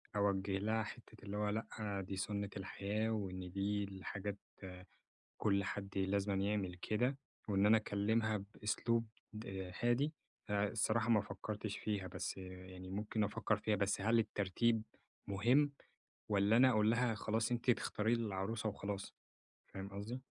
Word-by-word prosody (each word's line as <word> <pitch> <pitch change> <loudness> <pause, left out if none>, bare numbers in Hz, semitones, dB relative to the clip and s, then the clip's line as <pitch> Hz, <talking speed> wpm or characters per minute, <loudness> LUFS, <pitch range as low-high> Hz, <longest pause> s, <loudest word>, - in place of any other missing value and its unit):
أوجه 100 -1 +2
لها 110 +2 +1
حتّة 115 0 -10
اللي 100 +1 -4
هو 105 0 +1
لأ 105 -2 -2
دي 95 - -3
سنة 100 +1 -1
الحياة، 105 +3 -1
وإن 95 -4 -3
دي 100 +2 0
الحاجات 100 +1 -4 1.0
كل 100 -2 +2
حد 100 0 -3
لازمًا 100 +1 +1
يعمل 100 -2 0
كده، 120 +8 0 0.3
وإن 100 0 +4
أنا 110 +1 +8
أكلمها 110 0 +1
بأسلوب 115 +2 +1 0.3
د 95 -4 -5
هادي، 130 +6 +3 0.4
الصراحة 110 +3 +2
ما 105 -2 +6
فكرتش 105 0 -4
فيها 100 -3 -2
بس 90 - -3
يعني 95 0 -8
ممكن 105 +2 0
أفكّر 105 +1 +1
فيها. 105 0 +1
بس 100 0 +1
هل 115 +3 +4
الترتيب 110 +1 +2 0.4
مهم 125 +9 +4 0.6
والّا 105 +2 +4
أنا 130 +1 +7
أقول 110 -1 +4
لها، 115 0 +2
خلاص 110 +1 0
أنتِ 120 +1 +2
تختاري 110 -1 +2
لي 115 -1 0
العروسة 105 +3 -1
وخلاص، 100 -1 -4 0.5
فاهم 95 0 -6
قصدي؟ 105 +6 -5
105 Hz, 140 wpm, -37 LUFS, 100-110 Hz, 1.0 s, أنا